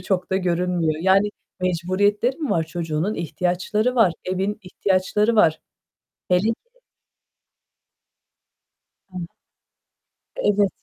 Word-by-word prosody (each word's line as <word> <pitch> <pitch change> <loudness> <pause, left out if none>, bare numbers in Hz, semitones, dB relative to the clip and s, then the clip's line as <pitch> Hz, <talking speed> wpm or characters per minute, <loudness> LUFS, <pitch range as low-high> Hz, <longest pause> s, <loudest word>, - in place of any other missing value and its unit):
çok 185 0 -2
da 190 - +2
görünmüyor. 175 -3 0
Yani 195 +2 +4 0.3
mecburiyetleri 185 +7 +1
mi 300 -5 -3
var 165 - +2
çocuğunun? 165 +3 -2
İhtiyaçları 180 +8 -1
var. 215 -8 +4
Evin 190 +3 -2
ihtiyaçları 195 +4 +1
var. 160 -6 +4 0.7
Hele 180 0 +4
ki - - +3 2.6
He. 180 -2 -6 1.1
Evet. 205 - +2
185 Hz, 95 wpm, -22 LUFS, 175-205 Hz, 2.6 s, Yani